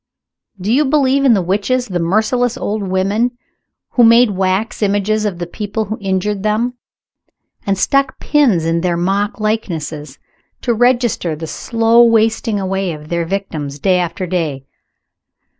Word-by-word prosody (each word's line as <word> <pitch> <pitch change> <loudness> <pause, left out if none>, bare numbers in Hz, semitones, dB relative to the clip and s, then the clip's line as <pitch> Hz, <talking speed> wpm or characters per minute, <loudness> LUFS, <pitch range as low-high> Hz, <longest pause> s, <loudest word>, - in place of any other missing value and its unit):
Do 200 +5 -1
you 290 +4 +4
believe 275 -1 +2
in 245 -4 +6
the 190 - 0
witches 210 +8 0
the 180 -4 -2
merciless 220 +7 +1
old 215 +1 -3
women 200 +6 0 0.5
who 245 - +3
made 230 0 +6
wax 190 +4 -1
images 205 +1 +1
of 200 -4 -2
the 175 - -4
people 210 +4 -4
who 215 +3 -5
injured 195 +1 -1
them, 215 +4 0 0.9
and 195 -1 +1
stuck 275 +5 +1
pins 250 - +2
in 165 +1 0
their 175 -1 0
mock 200 +5 -1
likenesses, 160 -10 -3 0.4
to 240 - 0
register 240 -8 +1
the 160 +2 -6
slow 230 +6 +2
wasting 225 -2 +2
away 190 -2 -2
of 150 0 -11
their 170 -1 -1
victims 160 -7 -4
day 180 +4 +2
after 180 +2 -3
day? 160 -7 -3
205 Hz, 150 wpm, -16 LUFS, 180-230 Hz, 0.9 s, in